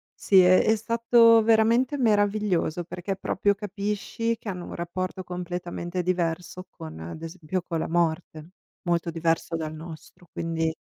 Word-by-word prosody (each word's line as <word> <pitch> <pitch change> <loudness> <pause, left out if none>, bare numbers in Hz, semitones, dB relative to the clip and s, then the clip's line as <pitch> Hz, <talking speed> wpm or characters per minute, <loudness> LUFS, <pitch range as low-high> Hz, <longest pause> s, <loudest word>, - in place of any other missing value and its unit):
sì 195 -2 +4
è 185 0 +6
è 220 - +3
stato 230 0 +5
veramente 230 +5 +3
meraviglioso, 205 - +1
perché 185 +2 -5
proprio 200 +1 +1
capisci 210 +3 -3
che - - -12
hanno 180 -3 -4
un - - -7
rapporto 185 +2 -4
completamente 180 0 -4
diverso 180 +1 -2
con, 80 0 -10
ad 85 - -8
esempio, 170 +2 -4
con 165 -3 -3
la - - -3
morte, 165 -1 -1 0.3
molto 170 -1 0
diverso 165 0 -1
dal 155 -1 -4
nostro, 160 +2 -11
quindi 165 -1 -2
180 Hz, 145 wpm, -26 LUFS, 165-205 Hz, 0.3 s, è